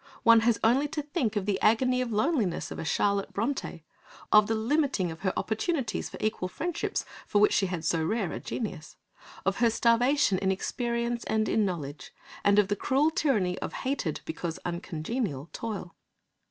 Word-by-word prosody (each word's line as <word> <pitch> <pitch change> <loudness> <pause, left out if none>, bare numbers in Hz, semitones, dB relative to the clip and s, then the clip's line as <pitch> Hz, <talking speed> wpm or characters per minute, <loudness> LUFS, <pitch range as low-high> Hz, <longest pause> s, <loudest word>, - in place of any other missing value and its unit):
One 230 -1 +7
has 225 0 +2
only 260 +6 +4
to 300 0 -4
think 285 - -1
of 205 -2 -1
the 200 -2 -1
agony 250 +4 +3
of 245 -2 -2
loneliness 215 - 0
of - - -6
a - - -3
Charlotte 200 +4 0
Brontë, 245 +7 -3 0.5
of 210 -1 +7
the 225 - +1
limiting 230 - +1
of 160 - -9
her 190 0 0
opportunities 235 +3 -1
for - - -9
equal 215 -4 -1
friendships, 325 - -3 0.2
for - - +1
which 210 - +5
she 195 - +2
had 175 -3 -4
so 160 0 +1
rare 200 +1 -1
a - - -4
genius, 195 -9 -5 0.5
of 195 +1 +1
her 235 -1 +4
starvation 235 -1 +3
in 190 -1 +1
experience 235 +4 -2
and 220 0 +1
in 215 - +2
knowledge, 155 -6 -5 0.3
and 200 0 +4
of 210 -2 +5
the 205 - 0
cruel 280 +9 +2
tyranny 215 - +1
of - - -5
hated, 260 - -2
because 165 0 -4
uncongenial, 170 - -3
toil. 210 -6 -5
220 Hz, 180 wpm, -28 LUFS, 185-250 Hz, 0.5 s, One